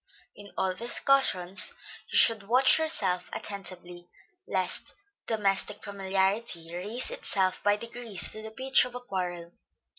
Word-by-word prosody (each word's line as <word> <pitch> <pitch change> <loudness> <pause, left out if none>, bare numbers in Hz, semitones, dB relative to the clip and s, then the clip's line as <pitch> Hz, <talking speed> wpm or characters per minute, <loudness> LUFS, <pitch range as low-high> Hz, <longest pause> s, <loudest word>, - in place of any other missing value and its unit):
In 205 -1 -13
all 190 -1 0
discussions 210 -4 +1 0.4
you - - +1
should 225 -2 +6
watch 255 +6 +6
yourself 190 - -1
attentively, 180 -3 -5 0.4
lest 185 -2 -1 0.3
domestic 210 -2 0
familiarity 190 -3 -2
raise 210 +8 -2
itself 185 -1 0
by 205 0 +3
degrees 235 -3 0
to 215 - -4
the 220 - -7
pitch 265 +4 +3
of 250 -1 -9
a - - -4
quarrel. 180 -6 -5
200 Hz, 125 wpm, -28 LUFS, 185-230 Hz, 0.4 s, should